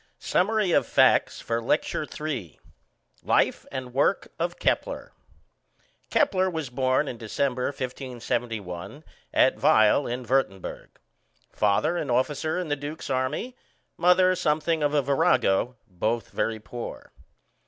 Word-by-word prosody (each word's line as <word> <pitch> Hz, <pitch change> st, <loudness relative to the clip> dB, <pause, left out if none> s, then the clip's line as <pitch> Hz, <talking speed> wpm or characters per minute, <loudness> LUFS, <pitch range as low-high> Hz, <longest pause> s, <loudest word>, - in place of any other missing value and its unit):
SUMMARY 210 Hz, 0 st, +1 dB
OF -, -, +3 dB
FACTS -, -, +3 dB
FOR 115 Hz, 0 st, -2 dB
LECTURE 150 Hz, +4 st, 0 dB
III 135 Hz, -, -4 dB, 0.6 s
Life -, -, +1 dB
and 130 Hz, -2 st, -6 dB
work 140 Hz, +8 st, +1 dB
of -, -, -2 dB
Kepler. -, -, -1 dB, 1.0 s
Kepler 190 Hz, -10 st, +2 dB
was 160 Hz, -7 st, -4 dB
born 130 Hz, +3 st, +1 dB
in 120 Hz, -, -6 dB
December, 125 Hz, +3 st, -1 dB
1571, 120 Hz, -, -4 dB, 0.3 s
at -, -, +3 dB
Weil 110 Hz, +6 st, +4 dB
in 125 Hz, +1 st, -3 dB
Würtemberg. 115 Hz, -7 st, -1 dB, 0.6 s
Father 105 Hz, +11 st, +2 dB
an 150 Hz, -, -3 dB
officer 145 Hz, +6 st, 0 dB
in 180 Hz, -3 st, -3 dB
the 145 Hz, -, +1 dB
duke's 145 Hz, +1 st, -6 dB
army, 130 Hz, -, -2 dB, 0.4 s
mother 180 Hz, +1 st, +4 dB
something 160 Hz, -2 st, 0 dB
of 145 Hz, 0 st, +1 dB
a 145 Hz, -, +3 dB
virago, 125 Hz, -3 st, +2 dB
both 110 Hz, +5 st, -2 dB
very 110 Hz, -1 st, -1 dB
poor. 120 Hz, +2 st, -8 dB
135 Hz, 120 wpm, -26 LUFS, 120-155 Hz, 1.0 s, Weil